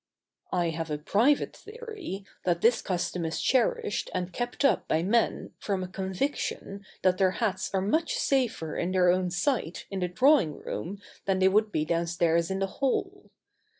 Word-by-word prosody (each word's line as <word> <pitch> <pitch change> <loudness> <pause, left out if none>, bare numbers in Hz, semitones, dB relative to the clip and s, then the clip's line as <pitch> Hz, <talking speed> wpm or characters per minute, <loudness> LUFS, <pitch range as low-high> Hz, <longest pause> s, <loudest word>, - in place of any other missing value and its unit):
I 175 -2 +1
have 165 0 -4
a 150 - -1
private 225 - +2
theory 425 - -8 0.2
that 175 -2 +1
this 230 +1 +4
custom 180 -1 -2
is 160 0 -2
cherished 240 -5 +1
and 180 0 -2
kept 245 +3 -2
up - - +3
by 160 +1 +1
men 230 +5 +1
from 195 -3 -2
a - - -4
conviction 195 +1 -3 0.2
that 185 0 +3
their 190 -1 +3
hats 210 -5 -1
are 190 - +1
much 315 +11 +1
safer 240 - 0
in 180 +2 -1
their 180 -1 +4
own 180 0 +1
sight 180 - -1
in 195 - -2
the 180 - 0
drawing 240 - +3
room 195 +4 -5 0.3
than 195 -1 +1
they 190 0 +4
would 210 +2 +2
be 155 -4 0
downstairs 170 0 +1
in 190 - -1
the 195 - +1 0.2
hall. 270 -2 -1
190 Hz, 175 wpm, -28 LUFS, 175-235 Hz, 0.3 s, this